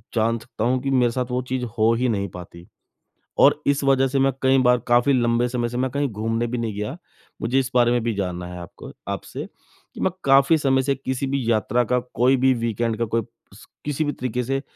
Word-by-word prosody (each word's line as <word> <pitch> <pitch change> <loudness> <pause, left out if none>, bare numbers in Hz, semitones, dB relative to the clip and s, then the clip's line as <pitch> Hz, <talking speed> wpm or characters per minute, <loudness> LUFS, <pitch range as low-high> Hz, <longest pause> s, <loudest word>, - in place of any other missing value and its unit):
जान 115 +1 +2
सकता 115 -1 -6
हूँ 130 +2 +2
कि 135 - -1
मेरे 125 -3 +3
साथ 125 +1 -2
वो 125 - 0
चीज़ 130 -1 -2
हो 110 +1 +4
ही 125 +2 0
नहीं 100 -3 -1
पाती 90 -1 -11 0.8
और - - +5
इस 140 0 +2
वजह 135 -1 +4
से 135 +1 -1
मैं 135 0 +3
कई 130 0 +4
बार 125 0 +5
काफ़ी 120 +3 +4
लंबे 120 -1 +2
समय 120 -1 -1
से 120 - -5
मैं 130 +1 0
कहीं 140 +1 -1
घूमने 115 +2 -2
भी 125 +1 -3
नहीं 115 -2 -2
गया, 105 +9 -4 0.4
मुझे 125 +4 +1
इस 135 0 -2
बारे 120 -1 +4
में 120 0 +2
भी 115 0 0
जानना 90 -3 -3
है 90 0 -8
आपको 85 0 -10 0.2
आपसे। - - -5 0.5
कि - - -9
मैं 190 - +1
काफ़ी 135 +4 +5
समय 135 -3 +2
से 140 +1 0
किसी 130 0 -3
भी 135 -1 -1
यात्रा 115 +2 +1
का 125 - +3 0.2
कोई 130 +3 +4
भी 130 +1 +3
वीकेंड 115 0 -1
का 115 - +1
कोई 115 +1 -1 0.3
स 105 - -15 0.2
किसी 150 +1 -1
भी 145 - 0
तरीके 125 0 -3
से 135 +2 -1
125 Hz, 230 wpm, -23 LUFS, 115-135 Hz, 0.8 s, और